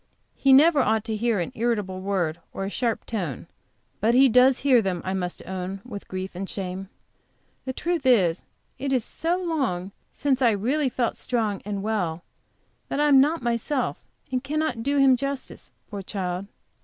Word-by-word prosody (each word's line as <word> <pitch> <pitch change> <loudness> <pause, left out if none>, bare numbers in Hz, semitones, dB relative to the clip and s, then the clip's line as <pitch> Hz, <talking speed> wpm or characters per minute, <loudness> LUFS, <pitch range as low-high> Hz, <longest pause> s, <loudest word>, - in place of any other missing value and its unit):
He 275 - +2
never 295 +3 +7
ought 220 -4 +2
to 220 -1 -3
hear 225 -1 +1
an 170 - -2
irritable 210 -5 -1
word, 180 -5 -1
or 195 - -3
a 195 - -4
sharp 235 -1 -1
tone; 180 - -4 0.5
but 225 +3 +3
he 270 +1 +7
does 250 +2 +5
hear 260 -4 +5
them, 185 -4 -2
I 190 - -1
must 180 -2 -3
own 190 +1 -4
with 205 -5 -8
grief 185 0 -5
and 190 +2 -5
shame. 190 0 -5 0.8
The 260 - -3
truth 340 +2 -1
is, 185 -9 +4 0.4
it 275 +1 -2
is 250 -4 +1
so 335 +2 -1
long 270 - -2 0.2
since 275 -2 0
I 235 -3 +5
really 265 +7 +1
felt 240 -2 -1
strong 220 -5 -1
and 200 -1 -3
well 180 -7 -1 0.7
that - - -2
I 295 - +4
am 270 -2 +7
not 300 0 +1
myself, 240 +4 -1 0.3
and 255 0 -1
can 295 +3 -3
not 310 -7 -1
do 280 +4 0
him 270 -2 +6
justice, 275 +1 -5 0.2
poor 200 -1 -4
child. 190 -1 -4
230 Hz, 180 wpm, -25 LUFS, 190-270 Hz, 0.8 s, never